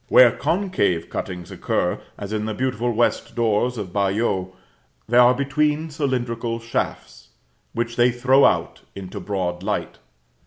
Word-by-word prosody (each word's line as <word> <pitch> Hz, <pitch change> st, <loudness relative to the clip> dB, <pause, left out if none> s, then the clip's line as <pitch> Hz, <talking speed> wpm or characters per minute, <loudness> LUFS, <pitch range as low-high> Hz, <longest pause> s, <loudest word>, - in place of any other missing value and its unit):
Where 125 Hz, -3 st, +7 dB
concave 155 Hz, -, 0 dB
cuttings 90 Hz, -2 st, -5 dB
occur, -, -, -1 dB, 0.2 s
as 100 Hz, +1 st, -6 dB
in 105 Hz, 0 st, -1 dB
the 110 Hz, -1 st, -3 dB
beautiful 120 Hz, -1 st, -1 dB
west 120 Hz, +1 st, 0 dB
doors 120 Hz, +1 st, +1 dB
of 95 Hz, -4 st, -6 dB
Bayeux, 100 Hz, -2 st, 0 dB, 0.6 s
they 120 Hz, +2 st, +4 dB
are 125 Hz, +1 st, +6 dB
between 150 Hz, +3 st, 0 dB
cylindrical 120 Hz, -5 st, -2 dB
shafts, 115 Hz, -, -4 dB, 0.4 s
which 115 Hz, 0 st, -3 dB
they 120 Hz, +1 st, +5 dB
throw 130 Hz, +3 st, +4 dB
out -, -, +2 dB
into 100 Hz, +1 st, -7 dB
broad 90 Hz, -2 st, -3 dB
light. 105 Hz, +2 st, -3 dB
115 Hz, 140 wpm, -22 LUFS, 100-125 Hz, 0.6 s, Where